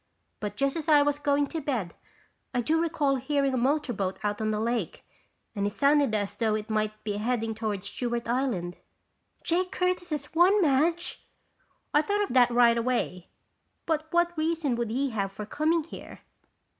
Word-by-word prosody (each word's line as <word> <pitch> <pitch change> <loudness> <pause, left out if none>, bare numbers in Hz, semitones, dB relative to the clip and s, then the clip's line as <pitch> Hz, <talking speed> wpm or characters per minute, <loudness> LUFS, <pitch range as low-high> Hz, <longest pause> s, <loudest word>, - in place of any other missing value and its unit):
But 205 -1 -4
just 275 +3 0
as 320 -1 -3
I 295 -2 +7
was 290 0 0
going 285 0 +2
to 325 - -4
bed, 235 - -2 0.6
I 245 - +2
do 320 +7 +1
recall 300 -5 +1
hearing 275 +1 0
a - - +1
motor 275 +1 +1
boat 195 -2 -2
out 205 +1 -1
on 215 - 0
the 210 -1 0
lake 235 +2 -2 0.5
and 200 -2 -1
it 205 - -4
sounded 280 -3 +3
as 205 -1 -2
though 220 -1 +1
it 215 +1 -4
might 215 0 -1
be 205 -1 -2
heading 225 0 -1
toward 215 -3 -3
Stewart 235 +3 -3
Island." 230 -9 -1 0.7
"Jake 365 +2 0
Curtis 360 -1 -1
has 295 -3 -3
one, 360 +5 +5
Madge!" 330 +2 +1 0.7
"I 295 - +5
thought 410 +6 0
of 400 - -4
that 250 -2 +6
right 235 -1 +4
away 230 -7 -2 0.6
but 315 -1 -1
what 345 0 +2
reason 315 -4 0
would 235 -1 -2
he 265 +4 -1
have 200 -3 -2
for 210 +2 -7
coming 315 +8 +1
here?" 325 - -11
260 Hz, 180 wpm, -27 LUFS, 215-310 Hz, 0.7 s, I